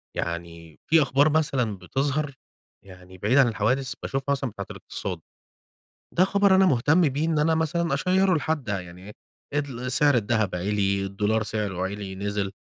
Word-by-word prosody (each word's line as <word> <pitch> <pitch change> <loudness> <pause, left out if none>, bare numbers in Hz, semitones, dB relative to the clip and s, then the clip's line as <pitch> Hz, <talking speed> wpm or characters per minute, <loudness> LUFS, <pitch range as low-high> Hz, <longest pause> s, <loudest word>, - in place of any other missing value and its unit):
يعني 85 -2 -6
في 160 -1 +5
أخبار 140 +3 +3
مثلًا 135 -9 0
بتظهر 140 +5 -2 0.5
يعني 90 0 -14
بعيدة 115 +9 +2
عن 125 - +4
الحوادث 125 +4 0
باشوفها 135 +1 -2
مثلًا 135 -2 -2
بتاعة 100 -2 -7
الاقتصاد. 90 -4 -6 1.0
ده 185 - +6
خبر 200 0 +3
أنا 190 0 +5
مهتم 145 +4 +3
بيه 145 +4 -2
إن 160 -2 +1
أنا 160 +2 +3
مثلًا 160 -1 0
أشيّره 185 +4 +2
لحد 155 -3 -1
ده 100 -3 -2
يعني 90 +1 -12
إيه، 105 - -9 0.4
إدل 130 -3 -3
سعر 145 0 +4
الدهب 110 -4 +1
عِلِي، 100 +1 0
الدولار 105 +3 0
سعره 100 -3 -3
عِلِي، 100 0 -5
نزل. 100 0 -3
120 Hz, 160 wpm, -25 LUFS, 100-150 Hz, 1.0 s, ده